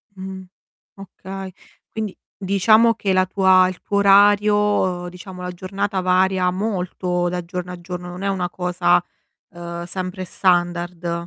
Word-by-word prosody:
Mh. 190 0 -7 0.5
Okay. 195 0 -9 0.4
Quindi, 215 -3 -5 0.2
diciamo 215 +4 +4
che 195 -4 -1
la 185 0 +3
tua 185 -1 +4
il 185 - -6
tuo 200 - -2
orario, 205 +1 +5 0.5
uhm, 175 - -6
diciamo 180 +1 -10
la 180 0 -4
giornata 195 +2 -3
varia 185 0 +2
molto 180 -3 -2
da 180 -1 -3
giorno 180 0 -5
a 180 - -8
giorno, 180 0 -7
non 180 +2 -8
è - - 0
una 185 -3 -1
cosa, 180 -1 +1 0.5
uhm, 170 0 -7
sempre 185 +1 -5
standard. 175 -1 -1
185 Hz, 145 wpm, -21 LUFS, 180-195 Hz, 0.5 s, orario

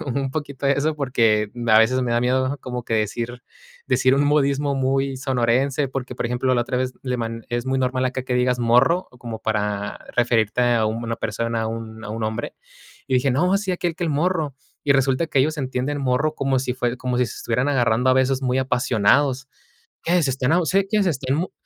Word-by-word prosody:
vez 140 -5 -4
un 135 -1 -1
poquito 140 -1 -4
eso, 140 +3 +1
porque 115 -7 +1 0.2
a 110 -1 +7
veces 130 +3 +3
me 120 -1 -1
da 120 - +2
miedo 130 +3 0
como 125 -1 -5
que 115 - -2
decir 115 +3 -2 0.5
decir 130 0 +3
un 140 - +2
modismo 145 -1 +2
muy 135 0 0
sonorense, 130 +2 +1
porque, 130 -1 -5
por 120 - -2
ejemplo, 125 +2 0
la 120 - +2
otra 120 +1 -2
vez 130 0 -1
le 125 -1 -2
man 115 -1 -4
es 120 0 -2
muy 130 0 0
normal 130 0 0
acá 130 0 -2
que 125 -1 -2
digas: 125 0 +1
"Morro", 125 +10 +3
como 115 -2 -6
para 105 -2 -2 0.2
referirte 120 -2 +2
a 110 -2 +2
una 115 +1 -3
persona, 115 +2 -2
a - - -1
un 110 0 -6
a - - -6
un 110 +1 -4
hombre, 110 0 -4 0.5
y 130 - +1
dije: 130 +2 +2
"No, 180 +9 +2
sí 195 -2 -2
aquel 175 -2 -2
que 175 - -2
el 165 - 0
morro", 155 -1 0 0.3
y 140 - +4
resulta 135 +4 +2
que 140 - 0
ellos 155 +3 +1
entienden 135 +1 -2
morro 140 +4 +1
como 135 -1 +1
si 125 -1 -2
fue 125 -1 -1
como 125 -1 -2
si 125 - +2
se - - -8
estuvieran 125 +4 -1
agarrando 125 -2 +2
a - - +5
besos 130 0 +1
muy 130 0 +1
apasionados. 130 +2 +2 0.5
"¿Qué 175 +1 +2
se 140 - +1
están 130 +2 0
abo 175 0 +2
se 195 +4 +2
quién 210 +1 +1
se 185 - +2
están 135 -2 -1
mo 175 +4 -2
130 Hz, 220 wpm, -22 LUFS, 120-140 Hz, 0.5 s, a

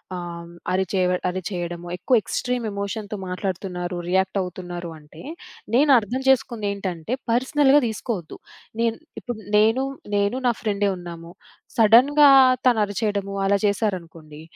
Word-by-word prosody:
ఆహ్, 180 - -4 0.2
హ్మ్, 170 - -13 0.2
అరిచే 190 0 0 0.3
అరిచేయడము, 175 -2 -5
ఎక్కువ 250 +8 +2
ఎక్స్‌ట్రీమ్ 250 -2 -2
ఎమోషన్‌తో 200 +1 -4
మాట్లాడుతున్నారు, 180 -1 -4
రియాక్టవుతున్నారు 180 -2 -2
అంటే, 150 +2 -15 0.5
నేనర్థం 260 -3 +3
చేసుకుందేంటంటే, 200 -7 -1 0.2
పర్సనల్‌గా 270 +3 +4
దీసుకోవద్దు. 210 -6 -5 0.4
నేన్ 230 -1 +1 0.2
ఇప్పుడు 240 -3 -6 0.2
నేను, 225 +5 +3 0.3
నేను 205 +5 +1
నా - - +4
ఫ్రెండే 205 -2 0
ఉన్నాము. 170 -1 -9 0.5
సడన్‌గా 260 +7 +6 0.4
తనరిచేయడము 205 -3 0
అలా 200 +1 +3
చేశారనుకోండి, 170 -7 -3
200 Hz, 105 wpm, -23 LUFS, 180-230 Hz, 0.5 s, సడన్‌గా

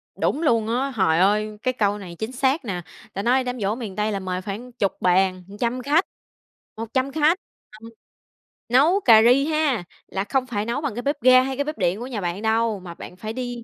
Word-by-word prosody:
Đúng 300 - -1
luôn 230 -8 +2
á. 250 +4 0
Hời 165 -6 +2
ơi, 210 +3 +2
cái 255 - +1
câu 205 -4 0
này 180 -4 -9
chính 220 +3 -3
xác 265 +3 0
nè! 180 -5 -3 0.3
Ta 195 - -3
nói 255 +4 +2
đám 250 0 -4
giỗ 205 +1 0
miền 225 -6 -7
Tây 210 +2 0
là 200 - -2
mời 185 -1 -3
khoảng 210 +6 -7
chục 205 -5 -2
bàn, 185 0 +2 0.2
trăm 245 +1 -1
khách, 300 +8 +2 0.7
100 260 +5 -2
khách. 315 +4 +3 0.4
Ừ, 225 - -10 0.8
nấu 295 +11 +4
cà 225 -3 +8
ri 250 +4 +5
ha 305 - 0 0.2
là 195 - -3
không 260 +4 0
phải 210 -4 -2
nấu 235 +5 -2
bằng 290 -6 -2
bếp 285 +1 -1
ga 255 0 +7
hay 270 +1 -2
bếp 305 +2 -5
điện 180 +1 +1
của 245 - -6
nhà 235 -6 -4
bạn 175 +2 -3
đâu, 220 -1 +1
mà 180 -2 -9
bạn 180 - -11
phải 215 +3 -6
đi 245 -1 -5
230 Hz, 215 wpm, -23 LUFS, 200-260 Hz, 0.8 s, cà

